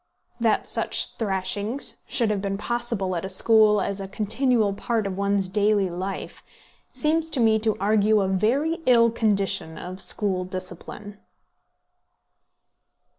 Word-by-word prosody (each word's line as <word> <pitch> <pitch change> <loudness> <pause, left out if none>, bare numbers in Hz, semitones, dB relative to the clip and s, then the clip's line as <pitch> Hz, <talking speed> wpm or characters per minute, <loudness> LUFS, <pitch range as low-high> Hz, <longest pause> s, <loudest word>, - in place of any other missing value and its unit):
That 230 -2 +1
such - - +1
thrashings 210 +4 -2
should 230 -3 +1
have 205 -2 -1
been 195 0 -2
possible 230 -4 -2
at 170 - -3
a 190 - -4
school 215 +1 +4
as 200 0 -3
a 195 - -5
continual 220 +1 +1
part 225 +1 -2
of 195 -1 -3
one's 200 0 0
daily 205 -1 +1
life, 185 +3 -6 0.5
seems 320 +1 0
to 280 - -1
me 220 -2 +4
to 220 -1 0
argue 210 +1 +3
a 190 - 0
very 255 - 0
ill 235 -2 +5
condition 200 -7 0
of 185 +1 -7
school 190 -4 -1
discipline. 185 +3 -8
210 Hz, 135 wpm, -24 LUFS, 195-230 Hz, 0.5 s, ill